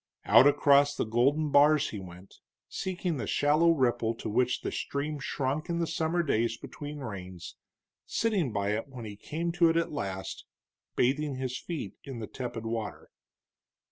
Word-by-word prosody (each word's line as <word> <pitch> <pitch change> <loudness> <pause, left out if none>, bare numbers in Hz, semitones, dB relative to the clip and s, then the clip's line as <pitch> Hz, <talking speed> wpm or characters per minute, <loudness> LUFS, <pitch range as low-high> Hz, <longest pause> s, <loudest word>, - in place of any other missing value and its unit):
Out 140 - +7
across 145 0 +5
the - - -1
broad 110 - -11
golden 140 +6 +2
bars 150 +1 +5
he 105 - -5
went, 90 0 -12 0.3
seeking 180 -3 -3
the 120 - -4
shallow 150 +4 +3
ripple 120 -7 +2
to - - -5
which 125 +3 +1
the - - -3
stream 145 +1 -3
shrunk 140 +3 -2
in 170 - 0
the 170 - +1
summer 165 +1 0
days 115 -5 0
between 145 +3 -8
rains, 95 -7 -7 0.5
sitting 200 - 0
by 100 -1 -1
it 110 +4 -2
when 125 -4 -9
he 105 -1 -7
came 165 +10 -3
to 170 -1 +4
it 165 - +2
at 170 - 0
last, 95 -9 -5 0.5
bathing 140 +3 +1
his 130 -1 -3
feet 165 +3 -5
in 135 -3 -7
the 110 - -4
tepid 120 -1 -6
water. 115 -2 -4
140 Hz, 175 wpm, -29 LUFS, 115-155 Hz, 0.5 s, Out